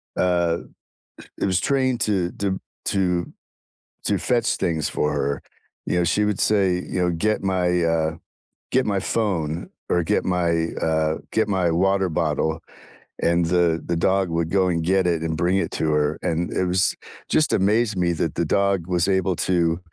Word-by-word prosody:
uh 85 -2 +1 0.8
It - - -1
was 95 -2 +2
trained 130 -2 +1
to 95 -4 +1
to 100 -1 0
b - - -3 0.3
to 90 -3 0 0.7
to - - +1
fetch 120 -2 +1
things 80 -5 -1
for 75 - -1
her, 70 0 -1 0.4
you 90 - 0
know, 85 - +2
she 105 +5 +2
would 105 -2 0
say, 100 -4 +3
you 90 +1 -3
know, 90 -1 +2
"Get 105 +6 0
my, 90 -2 +1
uh, 80 -1 +1 0.6
get 130 0 +2
my 100 -2 0
phone." 85 -7 -2 0.2
or 90 - +2
"Get - - +1
my, 85 -2 +1
uh, 80 -1 +1
get 110 - +1
my 95 -4 +1
water 95 +2 +2
bottle." 80 0 -1 0.6
and 85 0 +3
the 85 -1 +2
the 85 - -1
dog 95 +1 +1
would 85 0 -1
go 95 -2 +3
and 85 -2 0
get 95 +2 +2
it 85 -2 +1
and 80 -1 -1
bring 90 +3 +2
it 95 - -1
to - - -2
her, 75 0 0
and 85 -1 -1
it 95 - 0
was 90 +1 +1 0.3
Just 155 - +2
amazed 105 +2 +2
me 85 -1 +1
that 80 - -2
the - - 0
dog 100 -3 +1
was 90 -1 +1
able 95 -2 +1
to 85 -1 +2
90 Hz, 180 wpm, -23 LUFS, 85-95 Hz, 0.8 s, say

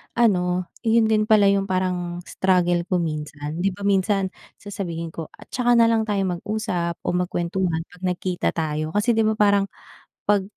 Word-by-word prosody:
ano, 180 -6 +2 0.2
'yun 225 0 +4
din 215 0 +2
pala 210 -3 +5
'yung 195 0 +1
parang 180 -2 -2
struggle 175 -2 +1
ko 185 - 0
minsan. 150 0 -4
'Di 190 0 0
ba 200 - -9
minsan 195 -1 +1 0.2
sasabihin 170 -5 -5
ko, 165 -2 -6 0.2
"Tsaka 245 -1 +2
nalang 230 -1 +4
tayo 200 -2 0
mag-usap 180 -2 -2
o - - 0
magkuwentuhan 175 -1 -1
'pag 180 +1 -17
nagkita 180 0 -1
tayo," 155 -1 -2
kasi 220 +4 +3
'di 225 -1 +2
ba - - -2
parang, 200 -1 +3 0.6
'pag 205 -1 +3
185 Hz, 160 wpm, -23 LUFS, 175-205 Hz, 0.6 s, pala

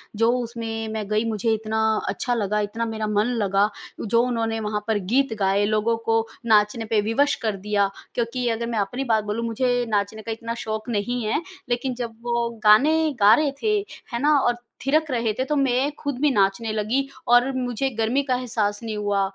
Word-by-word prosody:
जो 225 +2 +3
उसमें 225 -2 -4
मैं 215 -2 -3
गई 215 +1 +1
मुझे 220 +1 0
इतना 220 0 -1 0.3
अच्छा 245 - -1
लगा, 210 -2 0
इतना 230 +2 -3
मेरा 220 -1 -2
मन 210 0 +2 0.2
लगा 200 +1 +2 0.3
जो 230 +2 +2
उन्होंने 225 -2 -1
वहाँ 210 -1 -2
पर 220 - +2 0.2
गीत 270 -2 +3
गाए, 195 +1 +2
लोगों 215 +2 +1
को 225 0 +2 0.2
नाचने 215 0 +3
पे 215 -1 +2
विवश 275 +7 +2
कर 215 -2 +1
दिया। 200 -1 +2 0.3
क्योंकि 240 +1 -1
अगर 230 +1 -2
मैं 230 -2 -1
अपनी 245 +7 -2
बात 215 -1 +2
बोलूँ 210 +3 -2
मुझे 245 +1 0
नाचने 210 +1 -1
का 225 - -5
इतना 230 +1 -4
शौक 220 +2 -4
नहीं 235 +2 -1
है 220 +8 0 0.3
लेकिन 245 +2 -1
जब 235 -2 -5
वो 235 -1 0
गाने 280 +10 +6 0.2
गा 205 +1 +7
रहे 300 -2 +1
थे, 425 -1 +2 0.3
है 235 - -1
ना? 295 +1 +4
और 245 -2 +2 0.3
थिरक 310 +2 +2
रहे 230 -3 +1
थे 260 - +1
तो 300 - -1
मैं 270 0 +2
खुद 285 -3 -3
भी 300 - +4
नाचने 200 +1 +1
लगी 225 +6 0 0.2
और 245 +2 +5
मुझे 250 +1 -1
गर्मी 230 +5 +2
का 255 - +3
एहसास 220 -5 -1
नहीं 220 -2 -4
हुआ। 205 -1 0
225 Hz, 200 wpm, -23 LUFS, 215-245 Hz, 0.3 s, गा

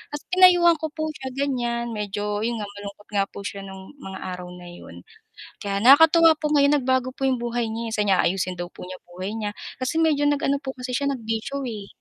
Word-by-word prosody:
at - - -4
pinayuhan 355 -2 +6
ko 315 - -2
po 310 0 -3
siya, 265 -3 -8
ganiyan, 240 -4 -1
medyo 205 0 -3
'yun 235 +1 -1
nga - - -3
malungkot 205 0 -10
nga 195 0 +3
po 200 - -10
siya 200 0 -5
nung 190 -1 -10
mga 190 -6 -8 0.2
araw 180 0 -9
na 180 - -12
'yun. 175 - -12 0.6
Kaya 200 -1 -2
nakakatuwa 320 +4 +7
po 300 -1 -1
ngayon 285 +1 +4
nagbago 260 0 0
po 270 - -6
'yung 260 - +2
buhay 240 -1 -2
niya, 225 +1 -4
eh, - - -5
sabi 210 -1 +1
niya 185 - +4
aayusin 185 +1 0
daw 175 - -3
po - - -11
niya 185 - -7
buhay 185 +3 -6
niya, 210 -2 -3 0.3
kasi 270 +6 -1
medyo 305 -3 +2
nag-ano 280 -1 +1
po 265 - -3
kasi 250 0 -6
siya 280 0 0
nagbisyo, 245 +3 -3
eh. 210 -3 -6
235 Hz, 220 wpm, -24 LUFS, 200-280 Hz, 0.6 s, nakakatuwa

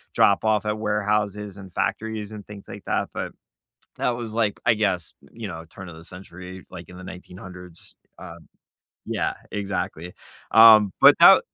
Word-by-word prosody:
drop 100 +1 +4
off 110 -1 +1
at 105 0 -2
warehouses, 105 -1 -1
and 95 -2 -11
factories, 110 -1 -2
and 105 -2 -9
things 100 -1 -11
like - - -10
that, - - -1
but, - - -5 0.6
that - - 0
was, 115 -2 -6
like, 110 -3 0
I 115 - +5
guess, 95 -6 -1
y - - -21
you 115 -2 -6
know, 80 -3 -8
turn 95 +1 -10
of 80 - -11
the 80 - -13
century, 90 0 -11
like, 85 -3 -10
in 90 - -12
the 90 - -10
1900s, 90 -1 -11 0.2
um 85 -3 -12 0.6
yeah, - - -1 0.2
exactly. 90 -4 -4 0.4
Um, 110 -3 +8
but - - +9
tha - - +9
100 Hz, 170 wpm, -24 LUFS, 90-105 Hz, 0.6 s, but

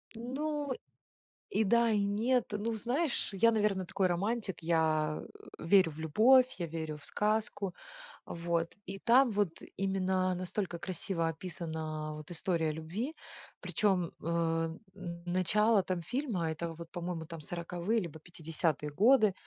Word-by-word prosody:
Ну, 285 +4 -3 0.8
и 220 - +2
да, 235 +3 +4
и 210 - +3
нет. 225 +5 +2
Ну, 215 +2 -1
знаешь, 255 +6 0
я, 215 +4 +5
наверно, 205 -4 +1
такой 190 0 +1
романтик. 195 +1 -1
Я, 155 -2 +1 0.4
э, - - -8
верю 175 -2 +5
в 150 - -13
любовь, 250 - +5
я 170 - -2
верю 160 -1 -4
в - - -14
сказку. 210 -3 -1 0.5
Вот. 170 0 -2
И 195 0 -6
там 245 +2 +5
вот 200 -5 0 0.2
именно 190 -1 +1
настолько 180 0 -3
красиво 175 -2 -2
описана 160 -2 -4
вот 155 +1 -9
история 165 -2 0
любви. 180 - -4 0.5
Причем, 190 -5 +1
э, - - -11
н 170 +2 -2
начало 195 +4 +3
там 180 -2 -2
фильма, 190 - -1
это 165 +1 -4
вот 165 0 -9
по-моему, 175 -2 -4
там 165 -1 -8
40-е 175 +7 -1
либо 160 -5 -6
50-е 160 -2 -2
годы, 215 - +5
185 Hz, 140 wpm, -32 LUFS, 165-215 Hz, 0.8 s, я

